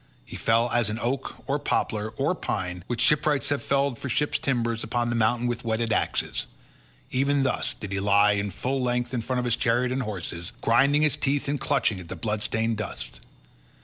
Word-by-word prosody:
He - - -9
fell 115 +1 +2
as 120 -3 +2
an 105 - -3
oak, 125 +3 -3
or 140 +1 0
poplar, 110 -5 -1
or - - +1
pine 90 -1 -3
which 120 - -2
shipwrights 150 -1 +3
have 145 -1 0
felled 140 -3 0
for 130 - -5
ship's 145 +5 +1
timber 120 -3 0
upon 120 +1 -1
the - - 0
mountains 120 +2 +2
with 120 - -3
whetted 115 0 0
axes—even 140 +5 -2
thus 130 - 0
did 105 -2 -7
he 100 - -1
lie 100 +1 +4
full 130 +8 -2
length 125 0 -1
in 120 - 0
front 125 +3 -2
of 125 - 0
his 120 -2 +3
chariot 125 +2 +1
and 130 +1 0
horses, 90 -6 -4
grinding 140 +6 +4
his 150 -1 +2
teeth 145 -1 0
and 145 0 -1
clutching 125 -8 +1
at 90 - -10
the - - -6
blood 105 -2 -2
stained 115 +1 0
dust. - - -6
120 Hz, 195 wpm, -26 LUFS, 110-135 Hz, -, lie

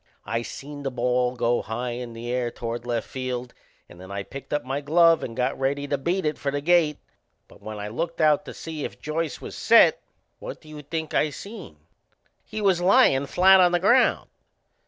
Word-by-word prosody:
I 115 +3 -1
seen 145 +4 -8
the 140 - -2
ball 125 0 0
go 120 0 +1
high 120 +3 -4
in 120 -1 -6
the 120 +1 -6
air 125 -1 0
toward 120 0 -6
left 120 -2 -2
field, 125 -2 -5 0.3
and 85 - -15
then 95 - -11
I 100 0 -4
picked 135 +6 -10
up 145 -4 -1
my 135 +2 -2
glove 165 +3 +4
and 115 - -6
got 130 +2 -1
ready 140 +2 -1
to 140 - 0
beat 170 +6 -1
it 150 0 -1
for 140 - -2
the 145 +1 -2
gate. 160 -1 +3 0.5
But - - -19
when 110 0 -7
I 105 0 -5
looked 165 +10 -4
out 155 -2 +4
to - - -8
see 160 -3 -6
if - - -6
Joyce 155 -1 -3
was - - -8
set, - - +5 0.4
what - - -8
do 155 - -17
you 150 -1 -9
think 160 +2 -5
I 155 - +2
seen? 195 - -10 0.7
He 215 - -6
was 190 -4 +2
lyin' 180 - +4
flat 190 +4 +6
on 180 -1 +5
the 175 - +3
ground! 240 +8 +3
140 Hz, 210 wpm, -25 LUFS, 120-165 Hz, 0.7 s, flat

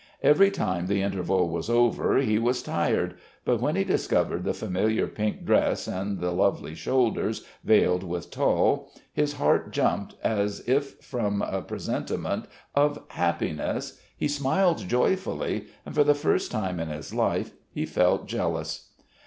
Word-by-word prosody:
Every 195 +7 +6
time 90 - -1
the 100 0 +1
interval 95 -2 +1
was 85 +5 -3
over 120 0 +3
he 110 -5 +2
was 125 +2 +1
tired, - - 0 0.3
but 120 -2 +2
when 150 +6 +1
he 195 - +2
discovered 190 - 0
the - - +1
familiar 105 +4 0
pink 105 0 -3
dress - - +2
and 95 +1 -3
the 90 0 -1
lovely 90 -3 +1
shoulders 110 +3 0 0.2
veiled 90 -4 +4
with 85 -2 -5
tulle - - +2 0.2
his 150 -1 +1
heart 145 - +2
jumped - - 0
as 105 -1 0
if 140 +2 0
from 105 -5 -1
a 95 - -2
presentiment - - -3 0.3
of 145 +1 +2
happiness, 85 -3 -2 0.2
he - - 0
smiled 150 +5 +2
joyfully, 125 - 0 0.2
and - - -7
for 150 0 +5
the 145 0 +4
first 145 +1 +1
time 95 -6 -2
in 80 - -2
his 75 -1 -7
life - - 0 0.2
he - - -2
felt - - +2
jealous. - - -3
110 Hz, 150 wpm, -26 LUFS, 95-140 Hz, 0.3 s, Every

